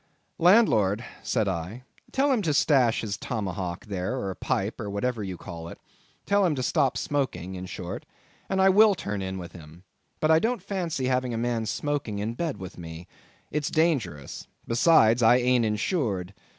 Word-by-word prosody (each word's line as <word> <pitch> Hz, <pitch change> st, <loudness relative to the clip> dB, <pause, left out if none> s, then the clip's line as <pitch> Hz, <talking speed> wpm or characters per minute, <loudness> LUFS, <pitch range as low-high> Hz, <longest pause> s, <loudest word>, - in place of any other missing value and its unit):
"Landlord," 120 Hz, -, +4 dB, 0.2 s
said 110 Hz, -4 st, 0 dB
I, 95 Hz, +7 st, -4 dB, 0.3 s
"tell 275 Hz, +2 st, +2 dB
him 245 Hz, -5 st, +2 dB
to 155 Hz, -6 st, 0 dB
stash 130 Hz, -7 st, +3 dB
his 105 Hz, -2 st, -3 dB
tomahawk 95 Hz, -6 st, -4 dB
there, 100 Hz, +5 st, -3 dB
or 95 Hz, -5 st, -3 dB
pipe, 100 Hz, +5 st, -2 dB
or 105 Hz, -, -4 dB
whatever 110 Hz, +2 st, -2 dB
you 95 Hz, -2 st, -5 dB
call 85 Hz, -1 st, -8 dB
it; -, -, -9 dB, 0.5 s
tell 200 Hz, 0 st, +3 dB
him 170 Hz, -5 st, +2 dB
to 130 Hz, -, -2 dB
stop 140 Hz, -1 st, +1 dB
smoking, 110 Hz, -, -2 dB
in 95 Hz, 0 st, -6 dB
short, 90 Hz, -1 st, -6 dB, 0.4 s
and 190 Hz, -, 0 dB
I 190 Hz, 0 st, +6 dB
will 205 Hz, +1 st, +6 dB
turn 100 Hz, -, -4 dB
in 95 Hz, 0 st, -4 dB
with 90 Hz, -2 st, -7 dB
him. 80 Hz, +1 st, -13 dB, 0.4 s
But 155 Hz, -, +2 dB
I 160 Hz, -, +6 dB
don't 225 Hz, 0 st, -1 dB
fancy 175 Hz, -9 st, -2 dB
having 125 Hz, -2 st, 0 dB
a -, -, -2 dB
man 115 Hz, -1 st, -1 dB
smoking 135 Hz, -2 st, -2 dB
in 105 Hz, +3 st, -2 dB
bed 160 Hz, +3 st, -3 dB
with 95 Hz, -1 st, -9 dB
me. 85 Hz, +1 st, -9 dB, 0.4 s
It's 150 Hz, -1 st, -1 dB
dangerous. 140 Hz, -, -1 dB, 0.2 s
Besides, 115 Hz, -2 st, +4 dB
I 115 Hz, +1 st, +6 dB
ain't 125 Hz, -1 st, +3 dB
insured." 105 Hz, -, -1 dB
115 Hz, 175 wpm, -26 LUFS, 95-150 Hz, 0.5 s, I